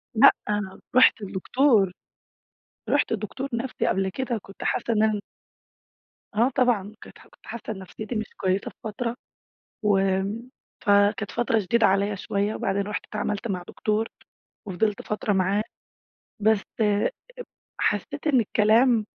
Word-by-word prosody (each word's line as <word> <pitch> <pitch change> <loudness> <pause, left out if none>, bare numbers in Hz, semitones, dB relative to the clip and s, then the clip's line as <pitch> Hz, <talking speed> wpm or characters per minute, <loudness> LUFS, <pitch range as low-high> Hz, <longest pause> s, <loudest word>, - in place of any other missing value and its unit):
لأ، 275 +5 +9 0.6
رحت 255 -3 +6
لدكتور. 200 +1 +2 1.0
رحت 285 -4 +2
لدكتور 225 +6 -3
نفسي 240 +2 -2
قبل 190 0 +1
كده 250 +4 -2
وكنت 195 -2 -9
حاسة 235 - 0
إن 215 -1 +3
أنا 215 -2 +2 1.2
آه 235 +4 +4
طبعًا. 220 -5 +2
كانت - - -13
كنت - - -21
حاسة 235 - -7
إن 190 - -9
نفسيتي 215 +5 -7
مش 215 - -1
كويسة 190 +1 0
في - - -31
فترة 230 +2 -3 0.7
وآمم، 195 +4 +1 0.4
فكانت 205 +1 +3
فترة 230 -2 +1
شديدة 220 +3 +3
عليّا 200 +1 +1
شوية، 200 +2 -1
وبعدين 195 +1 0
رحت 210 +1 -4
اتعاملت 210 +1 -3
مع 185 -4 -3
دكتور 215 +1 -1 0.6
وفضلت 200 +3 0
فترة 210 -1 -1
معاه. 195 +3 +2 0.8
بس 215 -1 +3 0.2
اب 205 - +3 0.7
حسيت - - -1
إن 270 -4 +4
الكلام 220 +1 +3
210 Hz, 130 wpm, -25 LUFS, 200-230 Hz, 1.2 s, لأ